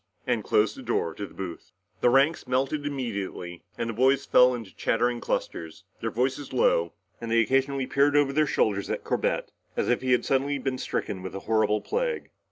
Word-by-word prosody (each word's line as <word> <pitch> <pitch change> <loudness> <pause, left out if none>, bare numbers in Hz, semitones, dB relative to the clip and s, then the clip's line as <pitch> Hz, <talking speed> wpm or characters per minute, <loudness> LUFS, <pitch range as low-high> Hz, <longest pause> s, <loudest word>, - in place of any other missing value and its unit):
and - - 0
closed 425 -6 +2
the 275 - -9
door 85 - -1
of - - -15
the 100 - -2
booth. 90 -3 -8 0.3
The 120 - +4
ranks 135 +4 +3
melted 135 +3 0
immediately 100 -10 -4 0.2
and 115 - -2
the 115 - -3
boys 130 +4 +3
fell 125 0 +5
into 115 -5 -9
chattering 120 +1 0
clusters, 80 +4 -3 0.2
their 115 - -1
voices 130 +4 -1
low, 85 -9 +2 0.3
and 115 - -5
they 115 0 +3
occasionally 135 +3 +1
peered 140 +2 +2
over 145 -2 +3
their 155 +1 +3
shoulders 100 -6 +1
at - - -2
Corbett - - -1 0.3
as - - 0
if 125 - +2
he 130 -1 +2
had 125 - +2
suddenly 140 +2 +1
been 130 -1 -3
stricken 95 -6 -3
with 95 +1 -7
a - - -3
horrible 110 -1 +1
plague. 480 0 -2
125 Hz, 195 wpm, -27 LUFS, 105-140 Hz, 0.3 s, fell